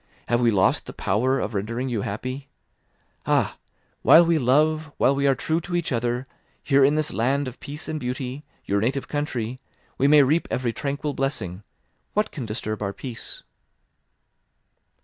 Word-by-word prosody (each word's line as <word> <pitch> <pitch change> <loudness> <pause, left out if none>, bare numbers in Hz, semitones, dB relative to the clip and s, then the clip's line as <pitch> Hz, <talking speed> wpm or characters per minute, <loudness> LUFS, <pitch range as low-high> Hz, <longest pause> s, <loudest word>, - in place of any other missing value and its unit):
Have 120 0 +2
we 120 - +4
lost 100 -4 +2
the - - -7
power 130 +7 +1
of 110 - -3
rendering 115 +6 -2
you 120 -5 -1
happy? 130 +8 -5 0.8
Ah! - - +1 0.4
While 170 +1 +8
we 165 -1 +3
love, 155 +4 +2
while 135 - +4
we 140 0 +1
are 135 - +4
true 160 +6 -1
to 175 +1 -4
each 175 -3 -1
other, 120 +1 -1 0.4
here 140 -1 +4
in 145 +3 +4
this 155 -1 0
land 135 +4 +1
of 125 - -8
peace 150 +2 -6
and 155 -1 -3
beauty, 130 +2 -4 0.2
your 100 0 +1
native 130 +5 -1
country, 130 -5 -3 0.4
we 140 - +4
may 150 0 +7
reap 155 +5 +2
every 120 -2 -1
tranquil 145 +2 -3
blessing—what 135 - -4
can 130 -7 -6
disturb 110 0 -4
our 100 -1 -2
peace?" 125 -1 -7
130 Hz, 165 wpm, -24 LUFS, 120-145 Hz, 0.8 s, While